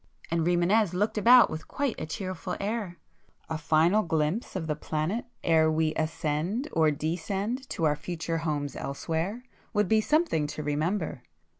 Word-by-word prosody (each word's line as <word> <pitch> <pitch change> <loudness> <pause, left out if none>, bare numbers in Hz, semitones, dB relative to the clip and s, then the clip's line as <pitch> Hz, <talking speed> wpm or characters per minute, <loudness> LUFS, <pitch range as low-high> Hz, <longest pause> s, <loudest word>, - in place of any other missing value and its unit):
and 165 0 +1
Rimânez 175 +4 +3
looked 210 +4 0
about 245 +3 +7
with 155 0 -6
quite 280 -4 -2
a 155 - -4
cheerful 185 +2 -4
air—"A 195 -6 -6
final 160 +6 +3
glimpse 160 +5 -1
of 180 -4 -2
the 155 -1 -1
planet 160 +13 -2 0.2
ere 160 -2 +4
we 155 0 +1
ascend 160 - -1
or 160 -1 +3
descend 190 - -2
to 165 - -3
our 150 -2 +3
future 165 +1 -3
homes 150 -3 -2
elsewhere, 165 - -3 0.3
would 210 -2 +2
be 220 +2 +4
something 300 - +1
to 150 +1 -5
remember! 155 0 -1
165 Hz, 150 wpm, -28 LUFS, 155-210 Hz, 0.3 s, about